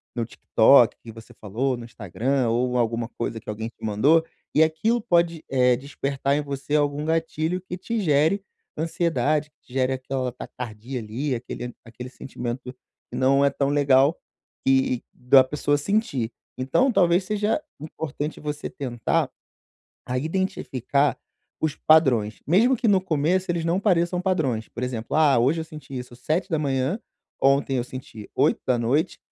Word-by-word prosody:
no 120 Hz, -2 st, -1 dB
TikTok, 120 Hz, +2 st, +4 dB
que 115 Hz, -, -9 dB
você 115 Hz, 0 st, -13 dB
falou 120 Hz, +6 st, -1 dB
no 120 Hz, -, -8 dB
Instagram, 120 Hz, +4 st, -1 dB
ou 125 Hz, +2 st, 0 dB
alguma 115 Hz, -1 st, 0 dB
coisa 115 Hz, -1 st, -4 dB
que -, -, -26 dB
alguém 110 Hz, +1 st, -4 dB
te 115 Hz, -, -10 dB
mandou, 140 Hz, +11 st, +3 dB, 0.3 s
e 155 Hz, -, +7 dB
aquilo 160 Hz, +10 st, +1 dB
pode, 170 Hz, -5 st, +1 dB
eh, 125 Hz, -2 st, +4 dB
despertar 140 Hz, +1 st, -2 dB
em 150 Hz, -, +1 dB
você 140 Hz, 0 st, -3 dB
algum 145 Hz, 0 st, +1 dB
gatilho 165 Hz, +2 st, -1 dB
que 180 Hz, -1 st, -7 dB
te 230 Hz, +5 st, -3 dB
gere 160 Hz, +2 st, +2 dB, 0.3 s
ansiedade, 155 Hz, -3 st, 0 dB
que 125 Hz, -, -17 dB
gere 130 Hz, 0 st, +1 dB
aquela 130 Hz, -1 st, -3 dB
taquicardia 125 Hz, 0 st, -7 dB
ali, 120 Hz, +6 st, -3 dB
aquele 120 Hz, 0 st, -6 dB
aquele 120 Hz, +2 st, -9 dB
sentimento 125 Hz, -1 st, -6 dB, 0.4 s
que -, -, -6 dB
não 135 Hz, +2 st, +4 dB
é -, -, +5 dB
tão 140 Hz, 0 st, -1 dB
legal 140 Hz, +1 st, +4 dB, 0.5 s
que 130 Hz, -2 st, +2 dB
da 130 Hz, +1 st, +5 dB
pessoa 145 Hz, +2 st, 0 dB
sentir. 145 Hz, -, -1 dB, 0.3 s
Então 190 Hz, -, +2 dB
talvez 180 Hz, -3 st, +3 dB
seja 210 Hz, +7 st, 0 dB, 0.2 s
importante 150 Hz, 0 st, -5 dB
você 150 Hz, 0 st, -4 dB
tentar 120 Hz, -4 st, -1 dB, 0.8 s
a 125 Hz, +1 st, -1 dB
identificar 145 Hz, -4 st, 0 dB, 0.4 s
os 155 Hz, -2 st, -1 dB
padrões, 125 Hz, -10 st, +3 dB
mesmo 230 Hz, -, +4 dB
que 235 Hz, -1 st, 0 dB
no 195 Hz, -2 st, +4 dB
começo 175 Hz, +2 st, 0 dB
eles 170 Hz, -1 st, -1 dB
não 170 Hz, +2 st, +1 dB
pareçam 175 Hz, -3 st, +2 dB
padrões. 150 Hz, -, 0 dB
Por 120 Hz, -, -7 dB
exemplo: 125 Hz, 0 st, -3 dB
"Ah, 150 Hz, -5 st, +5 dB
hoje 135 Hz, +8 st, +2 dB
eu -, -, -4 dB
senti 150 Hz, -4 st, -10 dB
isso 125 Hz, -1 st, -9 dB
7:00, 155 Hz, -, -1 dB, 0.4 s
ontem 135 Hz, 0 st, +3 dB
eu 120 Hz, -, -1 dB
senti 125 Hz, -4 st, -9 dB
20:00, 125 Hz, +5 st, +1 dB
140 Hz, 150 wpm, -24 LUFS, 125-160 Hz, 0.8 s, e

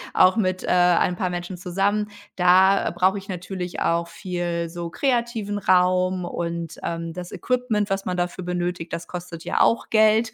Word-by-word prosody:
auch 185 Hz, +5 st, +5 dB
mit, 185 Hz, -3 st, 0 dB
äh, -, -, -6 dB
ein 180 Hz, 0 st, +3 dB
paar 185 Hz, 0 st, -1 dB
Menschen 175 Hz, +1 st, -5 dB
zusammen. 200 Hz, +4 st, 0 dB, 0.3 s
Da, 185 Hz, +2 st, +5 dB
äh, -, -, 0 dB
brauche 185 Hz, +3 st, +2 dB
ich 195 Hz, -, -15 dB
natürlich 180 Hz, 0 st, -5 dB
auch 170 Hz, 0 st, +1 dB
viel 170 Hz, -1 st, -3 dB
so 170 Hz, 0 st, -5 dB
kreativen 235 Hz, -4 st, -1 dB
Raum 185 Hz, -1 st, +2 dB
und, 170 Hz, -1 st, -4 dB
ähm, 165 Hz, -1 st, -4 dB
das 180 Hz, 0 st, -7 dB
Equipment, 230 Hz, -5 st, -1 dB
was 195 Hz, 0 st, -1 dB
man 180 Hz, -1 st, -2 dB
dafür 180 Hz, +1 st, -2 dB
benötigt, 175 Hz, -1 st, -3 dB
das 170 Hz, -, -4 dB
kostet 175 Hz, -2 st, -7 dB
ja -, -, 0 dB
auch 230 Hz, -, +2 dB
Geld. 220 Hz, +1 st, +4 dB
180 Hz, 175 wpm, -23 LUFS, 175-195 Hz, 0.3 s, auch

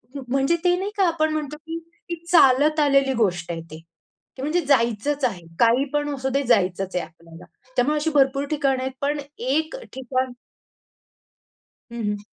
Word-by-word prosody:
म 275 Hz, -, -4 dB
म्हणजे 275 Hz, +6 st, +2 dB
ते 355 Hz, 0 st, +4 dB
नाही 395 Hz, +3 st, -3 dB
का? 385 Hz, -3 st, +4 dB
आपण 315 Hz, -2 st, +1 dB
म्हणतो 300 Hz, -1 st, -3 dB
की 325 Hz, +2 st, -6 dB, 0.3 s
ती 340 Hz, -, -2 dB, 0.2 s
चालत 300 Hz, 0 st, +5 dB
आलेली 275 Hz, -2 st, +3 dB
गोष्ट 175 Hz, -3 st, -1 dB
आहे 165 Hz, -1 st, -4 dB
ती. 155 Hz, -, -8 dB, 0.6 s
की -, -, -7 dB
म्हणजे 315 Hz, +5 st, +1 dB
जायचंच 265 Hz, +1 st, +1 dB
आहे. 190 Hz, -8 st, -2 dB, 0.2 s
काही 240 Hz, +4 st, +4 dB
पण 290 Hz, 0 st, 0 dB
असु 265 Hz, 0 st, -2 dB
दे, 275 Hz, +2 st, 0 dB
जायचंच 190 Hz, -5 st, +1 dB
आहे 180 Hz, -, 0 dB
आपल्याला. 165 Hz, +1 st, -15 dB, 0.3 s
त्यामुळे 275 Hz, +5 st, +2 dB
अशी 310 Hz, +2 st, 0 dB
भरपूर 275 Hz, 0 st, +3 dB
ठिकाणं 275 Hz, -3 st, +1 dB
आहेत 265 Hz, -, -2 dB
पण 290 Hz, +1 st, 0 dB, 0.2 s
एक 310 Hz, -, 0 dB, 0.2 s
ठिकाण 260 Hz, 0 st, -2 dB, 1.6 s
हं, 235 Hz, -1 st, -5 dB
हं. 205 Hz, -, -4 dB
270 Hz, 170 wpm, -23 LUFS, 235-300 Hz, 1.6 s, चालत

